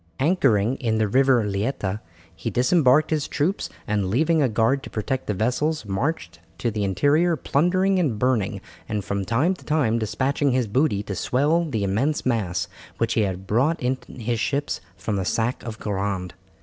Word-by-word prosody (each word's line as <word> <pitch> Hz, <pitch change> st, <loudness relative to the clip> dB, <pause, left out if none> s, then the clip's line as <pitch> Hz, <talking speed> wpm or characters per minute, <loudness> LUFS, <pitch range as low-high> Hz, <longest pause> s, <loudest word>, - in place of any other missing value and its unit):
Anchoring 135 Hz, -, +2 dB
in 110 Hz, -3 st, 0 dB
the 110 Hz, -1 st, +2 dB
River 130 Hz, +1 st, +4 dB
Leita, 105 Hz, 0 st, -2 dB, 0.4 s
he 80 Hz, -, -4 dB
disembarked 140 Hz, +3 st, +3 dB
his 150 Hz, -2 st, 0 dB
troops, 165 Hz, +8 st, -1 dB, 0.2 s
and 105 Hz, -3 st, 0 dB
leaving 155 Hz, -, +2 dB
a 135 Hz, -, +3 dB
guard 115 Hz, +5 st, +2 dB
to -, -, -9 dB
protect 130 Hz, +5 st, -3 dB
the 105 Hz, -, -1 dB
vessels 125 Hz, +8 st, 0 dB
marched 95 Hz, -, -2 dB, 0.2 s
to 115 Hz, +4 st, -1 dB
the 105 Hz, -1 st, -2 dB
interior, 145 Hz, -, +2 dB
plundering 185 Hz, +6 st, +2 dB
and 140 Hz, -11 st, 0 dB
burning, 105 Hz, -5 st, 0 dB, 0.3 s
and 105 Hz, -4 st, -2 dB
from 100 Hz, -1 st, -2 dB
time 130 Hz, -, +2 dB
to 185 Hz, -, -12 dB
time 135 Hz, -7 st, +1 dB
despatching 135 Hz, +5 st, 0 dB
his 125 Hz, -1 st, +2 dB
booty 105 Hz, -2 st, +1 dB
to 105 Hz, -, -5 dB
swell 145 Hz, -, +1 dB
the 115 Hz, -10 st, -2 dB
immense 120 Hz, +11 st, 0 dB
mass 110 Hz, -8 st, 0 dB, 0.3 s
which 115 Hz, 0 st, 0 dB
he 115 Hz, -, +2 dB
had 95 Hz, -2 st, -2 dB
brought 130 Hz, +11 st, +1 dB
in 125 Hz, +1 st, 0 dB, 0.2 s
his 120 Hz, -1 st, -2 dB
ships 140 Hz, -, -1 dB, 0.2 s
from 100 Hz, +2 st, -2 dB
the 95 Hz, -, -1 dB
sack 115 Hz, +6 st, -1 dB
of 115 Hz, -2 st, -7 dB
Guerande. 95 Hz, -3 st, -3 dB
120 Hz, 175 wpm, -24 LUFS, 105-145 Hz, 0.4 s, River